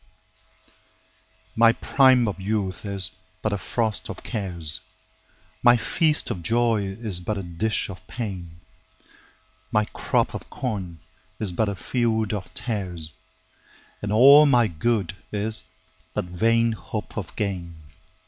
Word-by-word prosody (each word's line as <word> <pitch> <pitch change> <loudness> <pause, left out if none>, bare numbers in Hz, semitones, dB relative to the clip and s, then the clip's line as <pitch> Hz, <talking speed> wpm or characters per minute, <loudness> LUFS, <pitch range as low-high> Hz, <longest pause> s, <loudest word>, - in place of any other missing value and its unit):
1My 115 0 +5
prime 130 -3 +5
of 100 -2 -4
youth 100 -1 -2
is 95 -2 +1 0.3
but 110 - 0
a - - 0
frost 110 +1 -2
of - - -7
cares,2My 95 +3 -1
feast 155 +4 +1
of 95 -7 -4
joy 115 +1 +1
is 105 -7 +1
but 100 +4 -3
a 100 - -4
dish 90 +6 -1
of 95 -1 -10
pain,3My 95 0 -7
crop - - 0
of - - -7
corn 95 -9 -4 0.4
is 105 -4 +1
but 105 +4 0
a 100 - -3
field 110 0 0
of 100 -3 -5
tares,4And 95 -1 -7
all 140 +7 +8
my 120 -4 +5
good 100 +2 -1 0.2
is 110 +1 +2 0.5
but - - -1
vain 115 +6 +2
hope 110 - -6
of - - -6
gain. 90 -5 -3
100 Hz, 120 wpm, -24 LUFS, 95-115 Hz, 0.5 s, all